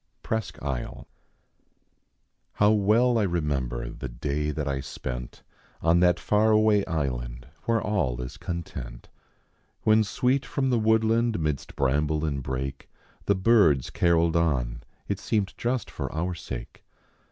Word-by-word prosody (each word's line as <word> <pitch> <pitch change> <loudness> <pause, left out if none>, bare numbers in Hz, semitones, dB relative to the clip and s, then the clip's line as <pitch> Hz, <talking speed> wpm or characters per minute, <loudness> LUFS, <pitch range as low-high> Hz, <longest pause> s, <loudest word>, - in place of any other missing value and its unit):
PKliSQUh 110 -2 -3
1S1.L: 65 -4 -4 1.5
How 105 +1 +4
well 110 +4 +3
I - - +2
remember 75 -10 -1
the 65 - -6
day 70 +5 -2
that 75 0 -2
1 70 -1 -1
spent 60 -2 -6 0.4
On 85 +2 +4
that 90 -1 +4
far 105 +1 +2
awav 105 -1 +4
island 60 -7 -3 0.2
where 115 -1 +2
all 75 - -1
is 60 0 -6
content; 65 -9 -6 0.7
When 110 0 +5
sweet 125 +6 +1
from 135 -1 -1
the 120 - +3
woodland, 110 0 +2
midst 75 -4 -2
bramble 75 +3 +1
and 70 -3 -2
brake, 65 +1 -4 0.4
The 100 - +3
birds 95 - +4
caroled 85 -1 +2
on 65 -8 0 0.3
it 100 -1 -2
seemed 105 -3 -1
just 125 +1 -2
for - - -4
our 85 +3 -2
sake. - - -8
85 Hz, 135 wpm, -26 LUFS, 70-105 Hz, 1.5 s, When